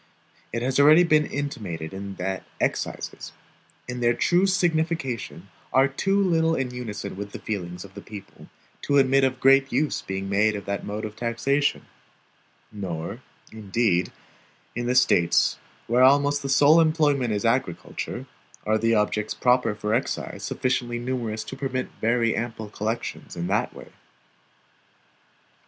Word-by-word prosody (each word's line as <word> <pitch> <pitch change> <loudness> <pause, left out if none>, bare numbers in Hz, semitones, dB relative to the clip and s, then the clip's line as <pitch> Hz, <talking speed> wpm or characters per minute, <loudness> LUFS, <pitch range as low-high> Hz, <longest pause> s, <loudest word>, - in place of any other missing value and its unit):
It 115 +1 -2
has 130 +1 0
been 140 - +6
already 155 +4 +8
intimated 140 - -1 0.3
that 95 +1 -3 0.2
excises, - - -3 0.5
in 125 0 -5
their 120 0 +2
true 180 +2 +3
signification, 160 - -1 0.2
are 135 +1 +5
too 195 +9 0
little 165 -4 +2
in 130 -3 -2
unison 115 -7 -6
with 100 +1 -7
the - - -4
feelings 90 -3 -5
of 95 - -15
the - - -9
people, 100 -3 -11 0.3
to 140 - +1
admit 135 0 +4
of 130 -1 +1
great 135 +1 +5
use 145 +4 0
being 95 0 -4
made 105 +2 +2
of 100 -2 -6
that 100 0 -3
mode 105 +2 -4
of 105 0 -7
taxation; 125 +5 0 0.9
nor, 95 +2 -5 0.3
indeed, 105 -3 0 0.6
in 120 +1 -2
the 125 - +1
States 90 -9 +3 0.3
where 120 +2 +2
almost 145 +2 +4
the 140 - -4
sole 145 +4 +6
employment 150 -6 +2
is 105 +2 -1
agriculture, 115 -7 -2 0.4
are 110 +1 +2
the 115 0 +2
objects 105 0 0
proper 125 -3 +2
for 105 +1 -2
excise 120 - -2
sufficiently 120 -2 -1
numerous 120 -3 -3
to - - -8
permit 135 -2 -3
very 115 0 +2
ample 115 -2 -4
collections 110 +3 -4
in 85 - -3
that - - 0
way. - - -12
120 Hz, 145 wpm, -25 LUFS, 105-140 Hz, 0.9 s, already